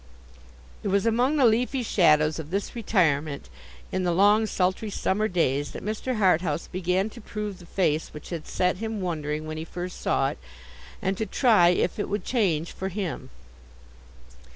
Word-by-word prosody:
It - - -4
was 200 +1 +2
among 245 +6 +2
the 270 - +5
leafy 245 +3 +2
shadows 155 -7 +3
of 155 -1 -7
this 195 +6 -3
retirement, 155 - 0 0.4
in 185 - -1
the 175 - +1
long 205 +5 +4
sultry 190 +3 0
summer 205 +1 0
days, 145 -7 0
that - - -7
Mr. 220 +4 -2
Harthouse 175 -6 +2
began 185 +2 0
to 235 - -11
prove 210 -2 -5
the 175 - -14
face 160 -5 0
which 150 - -10
had 165 -3 -5
set 180 0 0
him 220 +1 -4
wondering 155 -4 -3
when 155 0 -5
he 160 - -4
first 175 +2 -6
saw - - +1
it, - - -8 0.6
and 190 0 -1
to 220 - -1
try 210 -6 +5
if 180 +2 0
it - - -2
would 205 +1 -2
change 175 -10 0
for 190 - -4
him. 180 -9 -4
185 Hz, 175 wpm, -26 LUFS, 160-215 Hz, 0.6 s, the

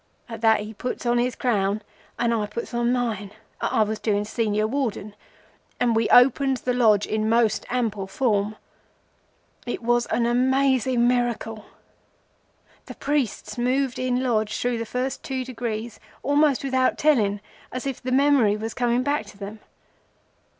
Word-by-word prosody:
At 225 -2 -8
that 220 -2 +4
he 210 +1 -7
puts 250 +4 -5
on 240 0 +2
his 245 0 0
crown 205 -3 0 0.3
and 235 -1 +1
I 215 -2 -1
puts 235 +4 -6
on 240 0 +1
mine—I 220 -2 -2
was 215 0 -3
doing 210 -1 0
Senior 215 -1 0
Warden—and 225 -1 -4
we 225 0 +1
opens 265 +1 +5
the 250 - 0
Lodge 220 -5 +4
in 215 0 -1
most 230 -2 +2
ample 220 -6 -1
form. 210 -1 0 1.1
It 240 - -4
was 240 0 +2
a - - 0
amazing 255 0 +2
miracle! 235 -3 -1 1.2
The - - -8
priests 275 -5 -2
moved 255 +1 0
in 255 0 0
Lodge 220 -4 0
through 245 -1 -1
the 230 - -4
first 255 +3 -3
two 260 -2 -4
degrees 235 -2 -5 0.2
almost 285 -1 +2
without 260 -1 +1
telling, 220 -10 +2 0.3
as 255 +1 -5
if 270 -3 -4
the 255 - -4
memory 260 -6 +4
was 220 +1 -5
coming 245 0 +1
back 285 -6 -1
to 200 - -14
them. 205 +2 -8
240 Hz, 150 wpm, -24 LUFS, 215-255 Hz, 1.2 s, opens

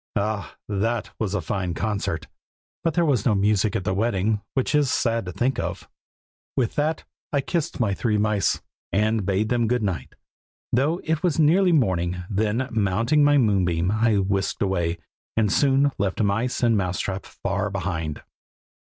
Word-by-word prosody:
Ah! 105 0 -2
that 105 +3 -1
was 105 -2 -1
a 100 - 0
fine 90 -1 -2
concert! 100 -5 -2 0.6
but 165 -3 0
there 170 - +3
was 130 -9 +2
no 110 - +3
music 100 +1 +2
at 95 - -1
the 100 - 0
wedding, 105 0 0
which 130 +2 0
is 145 -2 +3
sad 115 -4 0
to 90 - -5
think 120 +7 0
of." - - -4 0.7
With 120 -4 +1
that 155 +2 0 0.3
I 140 - +2
kissed 165 +2 -2
my 110 -5 +1
three 105 +1 0
mice, 105 -1 +1 0.3
and 105 +1 +1
bade 100 +2 +1
them 120 -2 +2
good 125 0 +1
night, 95 -5 -3 0.6
though 150 +8 +2
it 160 -1 0
was 175 -5 +1
nearly 175 +5 +5
morning; 90 - +1
then 110 +5 0
mounting 115 +7 +2
my 145 0 +5
moonbeam 95 -7 +2
I 110 0 +2
whisked 95 +1 0
away, 85 -3 0 0.4
and 105 -3 +2
soon 140 0 +3
left 95 -1 -1
mice 110 +5 0
and 115 -2 +4
mouse 90 -3 -1
trap 95 0 -3
far 100 +1 -3
behind. 85 -6 -3
105 Hz, 170 wpm, -24 LUFS, 95-125 Hz, 0.7 s, nearly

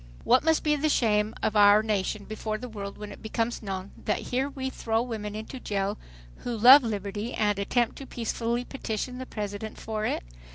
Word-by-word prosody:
What 250 +2 +4
must 320 0 +3
be 300 -1 +3
the 300 +2 +1
shame 215 -5 +2
of 215 - +1
our 205 +1 +7
nation 210 -1 -1
before 215 0 -3
the 250 - -7
world 200 -3 -7
when 210 0 -7
it - - -11
becomes 230 +2 -2
known 195 -2 -5
that 210 - +1 0.2
here 265 +3 +1
we 265 -2 -4
throw 225 -3 -1
women 215 -4 -5
into 220 +5 -6
jail 200 -2 -2 0.4
who 240 -2 -4
love 255 +6 +10
liberty 210 0 -3
and 205 -1 +1
attempt 235 +4 0
to 275 - -8
peacefully 235 +1 -2
petition 250 -1 -4
the 260 - -6
President 210 0 -5
for 215 -1 -3
it? - - -2
220 Hz, 195 wpm, -27 LUFS, 210-245 Hz, 0.4 s, love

